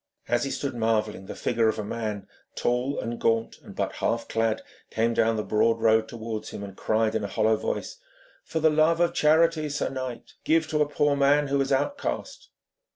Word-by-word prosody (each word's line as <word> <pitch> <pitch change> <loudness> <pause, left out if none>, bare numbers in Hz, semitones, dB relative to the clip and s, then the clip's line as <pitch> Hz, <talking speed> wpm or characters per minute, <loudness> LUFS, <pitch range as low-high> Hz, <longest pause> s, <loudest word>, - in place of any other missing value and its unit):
As 120 +2 +1
he - - -2
stood 140 0 -3
marvelling, 110 -4 -1
the - - -6
figure 115 -1 +1
of 110 - +1
a 105 - -3
man, 105 -1 -4 0.3
tall 125 +3 0
and 115 0 -4
gaunt 115 0 +1
and - - -12
but - - -2
half 115 0 -1
clad, 115 -1 0 0.3
came 115 +1 +1
down 115 0 +2
the 105 - -1
broad 115 +2 +2
road 110 0 +3
towards 110 -2 -5
him, 100 - -7
and 100 -1 -8
cried 110 +1 +1
in 110 - -1
a - - -2
hollow 110 +2 +2
voice: 110 - -4 0.5
'For 160 - -3
the 160 0 +4
love 155 +2 +3
of 175 0 +2
charity, 155 0 +3
sir 145 - -1
knight, 130 -2 -6
give 160 0 +2
to 150 -1 +1
a 145 - +2
poor 145 -1 +2
man 140 +1 +3
who 140 0 +2
is 135 0 -1
outcast.' 285 - -2
120 Hz, 205 wpm, -26 LUFS, 110-145 Hz, 0.5 s, the